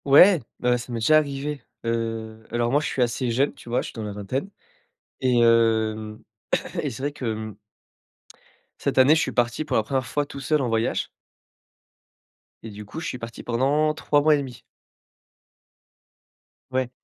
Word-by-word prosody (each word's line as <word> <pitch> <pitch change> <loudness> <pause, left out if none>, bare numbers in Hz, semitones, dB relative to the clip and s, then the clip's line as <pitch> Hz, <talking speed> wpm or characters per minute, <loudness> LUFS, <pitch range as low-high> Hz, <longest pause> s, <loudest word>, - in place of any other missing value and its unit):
Ouais, 170 +6 +8 0.2
bah 125 0 +2
ça 125 +1 -8
m'est 120 - -2
déjà 155 +8 +5
arrivé! 145 -1 -2 0.2
Heu, 115 -1 -3
alors 120 0 0
moi 145 +2 +3
je - - -2
suis 130 - +1
assez 120 +1 -1
jeune, 130 +5 +1
tu - - -13
vois? 120 - +1
Je - - -6
suis - - -9
dans 110 - -6
la 105 -1 -5
vingtaine 130 - -3 0.7
et 125 -2 +3
hem, 110 -2 +2 0.6
et 145 - -2
c'est 130 +2 -8
vrai 145 +1 -1
que, 145 -3 -8
hem 110 -2 -3 1.2
cette - - -2
année, 130 +4 +7
je 160 - +2
suis - - -1
parti 120 +5 0
pour - - -2
la 110 - +2
1ère 130 +3 -1
fois 145 +3 -1
tout 140 - -9
seul 150 +2 +1
en 125 - -1
voyage 115 0 0 1.6
et 110 - -7
du 105 +1 -9
coup, 105 +10 -7
je 160 - -4
suis - - -4
parti 115 -1 -8
pendant 140 +6 +2
3 145 -1 +1
mois 155 +1 +5
et - - +1
demi. 130 -4 -7 2.1
Ouais. 130 -1 0
125 Hz, 185 wpm, -24 LUFS, 115-140 Hz, 2.1 s, Ouais